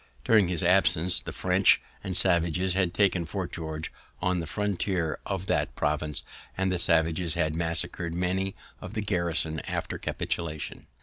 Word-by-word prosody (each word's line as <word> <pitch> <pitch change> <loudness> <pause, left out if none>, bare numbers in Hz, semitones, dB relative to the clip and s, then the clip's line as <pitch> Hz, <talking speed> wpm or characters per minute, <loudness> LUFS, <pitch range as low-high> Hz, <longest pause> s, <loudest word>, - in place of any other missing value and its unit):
During 110 -5 +5
his 85 -2 -1
absence 90 -1 +4
the - - -6
French - - +4 0.2
and 95 -1 -2
savages 90 0 +2
had 95 -2 +1
taken 95 -3 +2
Fort 95 0 -4
George, 80 -1 -4 0.3
on 90 0 0
the 80 - -4
frontier 95 -5 -1
of 95 -2 -3
that - - 0
province, 75 0 -1 0.3
and 95 0 +1
the 90 - 0
savages 85 0 +2
had 80 -2 0
massacred 85 0 +2
many 95 +2 -1 0.2
of 95 +5 -9
the 110 - -1
garrison 85 -5 -1
after - - -3
capitulation. 80 -3 -4
90 Hz, 150 wpm, -27 LUFS, 80-95 Hz, 0.3 s, During